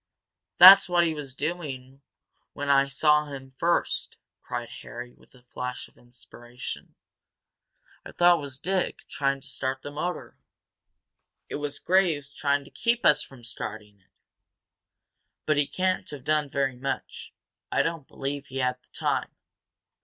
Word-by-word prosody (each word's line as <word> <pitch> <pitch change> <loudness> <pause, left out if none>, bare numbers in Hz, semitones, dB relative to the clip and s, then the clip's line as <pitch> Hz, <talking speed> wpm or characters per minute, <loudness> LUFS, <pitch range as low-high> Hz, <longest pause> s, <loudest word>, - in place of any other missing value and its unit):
"That's 190 +2 +10
what 175 -1 +4
he 165 - 0
was 140 -4 -8
doing 140 -4 -5 0.5
when 145 0 -4
I 140 0 +5
saw 150 +2 +3
him 135 -2 -9
first," 170 +1 0 0.2
cried 120 -1 -5
Harry, 120 0 -9
with - - -23
a 125 - -20
flash 125 0 -6
of - - -27
inspiration. 120 0 -10 1.1
"I - - -10
thought 175 0 +5
it - - -6
was 140 -2 -6
Dick, 185 +5 -2
trying 140 -1 -1
to 140 - -9
start 130 -1 -3
his 145 - -7
motor 175 +4 -4 1.1
it - - -3
was 145 -1 -4
Graves 165 -7 +1
trying 140 -1 0
to - - -16
keep 235 0 0
us 150 -1 +6
from 130 -3 -12
starting 105 -3 -7
it! 90 - -35 1.4
But 155 -1 +2
he 145 -1 +2
can't 185 +5 -1
have 145 -3 -8
done 150 0 +1
very 135 -2 0
much 135 +2 -5 0.4
I - - +3
don't 165 -4 -3
believe 140 +1 -5
he 130 - -7
had 125 -1 0
the - - -34
time. - - -1
140 Hz, 155 wpm, -27 LUFS, 130-155 Hz, 1.4 s, That's